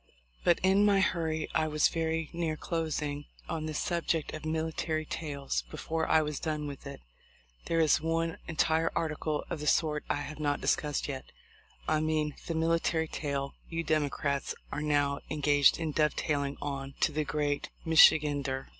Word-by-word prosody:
"But 175 - +4
in 190 +2 +5
my 200 -1 +5
hurry 160 -5 0
I 155 - +2
was 150 -1 +3
very 160 -1 -2
near 165 -2 -1
closing 150 -4 -2 0.2
on 160 -2 -3
this 155 -1 -3
subject 170 -2 -1
of 155 0 -6
military' 160 0 -1
tails 140 - -3
before 160 - -2
I 160 - +4
was 150 -1 -3
done 155 -2 -2
with 140 -1 -7
it. 140 - -8 0.6
There 165 - +1
is 155 -2 +4
one 165 +1 -1
entire 160 0 +1
article 155 -1 -1
of 170 - -2
the 150 - -4
sort 150 -2 +2
I - - +2
have 150 +1 -7
not 145 -1 0
discussed 150 -1 0
yet; 135 -2 -5 0.6
I 155 - +2
mean 155 -1 0
the 165 - -2
military 165 0 +1
tail 140 -2 -3 0.2
you 165 0 -2
Demo 155 -3 +1
crats 140 0 -2 0.2
are 150 - -3
now 145 -2 +1
engaged 145 -2 +4
in 160 -2 -1
dovetailing 145 -2 0
on 140 -1 -4
to - - +3
the 155 +1 0
great 145 -1 -1 0.2
Michigander. 145 -4 +5
155 Hz, 165 wpm, -30 LUFS, 145-160 Hz, 0.6 s, in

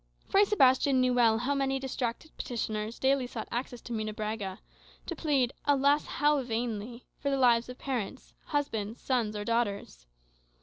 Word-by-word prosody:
Fray 400 +1 +5
Sebastian 270 -8 +4
knew 255 0 +3
well 230 -3 +4
how 250 +5 0
many 270 -1 0
distracted 265 +2 -4
petitioners 220 -2 -3
daily 265 -1 +2
sought 230 -2 -6
access 245 0 -4
to 240 - -7
Munebrãga, 215 -2 -3 0.5
to 340 - -4
plead 275 -6 +1
(alas, 285 +1 +3
how 295 -1 +2
vainly!) 235 -1 -4
for 280 - -1
the 275 - +1
lives 240 -2 +4
of 250 - -8
parents, 250 -7 -4
husbands, 230 -7 -2
sons, 235 -5 0
or 205 0 -4
daughters. 200 - -2
245 Hz, 150 wpm, -30 LUFS, 220-275 Hz, 0.5 s, Fray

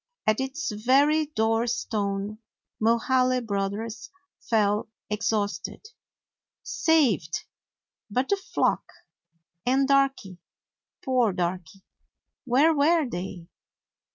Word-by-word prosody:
At 215 +2 +2
its 265 +1 -3
very 280 +8 +3
door 225 -4 +1
stone 205 -3 -2 0.4
Mulhaly 255 +3 +3
Brothers 205 +2 -3 0.4
fell 210 -1 +2 0.2
exhausted. 210 - -2 0.7
Saved! 285 - +1 0.7
But 255 +6 -1
the 400 - +3
flock, 390 - -1 0.7
and 265 +2 +2
Darky 275 -10 +1 0.3
— - - -33
poor 250 -6 +2
Darky 180 +1 -4 0.3
— - - -61
where 295 +6 +5
were 310 +1 +3
they? 180 -5 -6
230 Hz, 95 wpm, -26 LUFS, 205-275 Hz, 0.7 s, where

